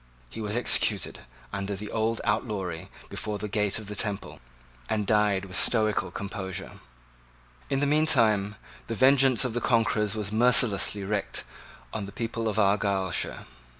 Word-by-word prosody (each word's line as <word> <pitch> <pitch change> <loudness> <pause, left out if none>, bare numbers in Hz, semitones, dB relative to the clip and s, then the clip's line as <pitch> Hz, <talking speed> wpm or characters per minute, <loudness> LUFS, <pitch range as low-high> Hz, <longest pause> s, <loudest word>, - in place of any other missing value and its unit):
He - - -7
was 105 0 -3
executed 120 - +3 0.3
under 100 0 -3
his 105 +2 -7
old 110 +1 -1
outlawry 105 -6 -2 0.2
before 105 -1 -4
the 105 - -5
gate 105 -1 0
of 110 - -7
the 105 +1 -6
Temple, 100 -1 -2 0.5
and 105 -2 0
died 105 -2 +2
with 90 -2 -7
stoical 110 -4 +3
composure. 95 0 -6 0.9
In 135 - 0
the - - +3
meantime 115 -9 +2 0.3
the 115 - -3
vengeance 135 0 +4
of 125 - -2
the 120 - -2
conquerors 110 -3 +1
was 105 -2 -3
mercilessly 110 -3 +3
wreaked 100 0 -2 0.5
on 100 -2 -4
the - - -9
people 115 0 -3
of 110 - -2
Argyleshire. 100 -3 0
105 Hz, 150 wpm, -27 LUFS, 100-115 Hz, 0.9 s, vengeance